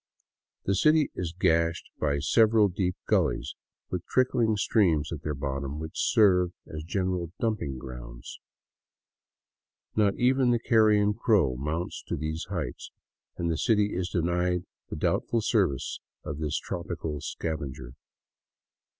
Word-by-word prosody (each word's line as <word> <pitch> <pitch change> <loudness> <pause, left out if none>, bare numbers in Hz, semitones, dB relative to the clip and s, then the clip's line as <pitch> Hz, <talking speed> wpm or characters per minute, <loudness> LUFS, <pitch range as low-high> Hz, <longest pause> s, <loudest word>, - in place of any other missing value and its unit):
The 100 - +1
city 155 +9 +4
is 85 -3 -3
gashed 85 -1 +1
by 70 -2 +1
several 110 +7 +4
deep 90 0 -1
gullies - - +1 0.4
with 90 - -1
trickhng 120 -4 +2
streams 85 -8 +2
at 80 -4 -5
their 75 -1 -3
bottoms, 70 +1 -3
which 80 0 -5 0.2
serve 90 -4 +4
as 75 0 -7
general 90 -1 -2
dumping 105 - -1
grounds. - - -9 1.6
Not 105 -2 +3
even 130 +1 +3
the 120 - +4
carrion 110 -3 +4
crow 105 - +2
mounts 75 +7 -3
to - - -2
these 80 +2 -4
heights, 80 -10 -4 0.5
and 85 -1 -1
the 80 - -2
city 105 -2 +2
is 90 0 -2
denied 90 +1 0 0.2
the - - -4
doubtful 115 - 0
services 95 - 0 0.2
of 70 - -5
this 75 -2 -1
tropical 75 -3 -4
scavenger. 70 -7 -5
90 Hz, 130 wpm, -28 LUFS, 75-105 Hz, 1.6 s, city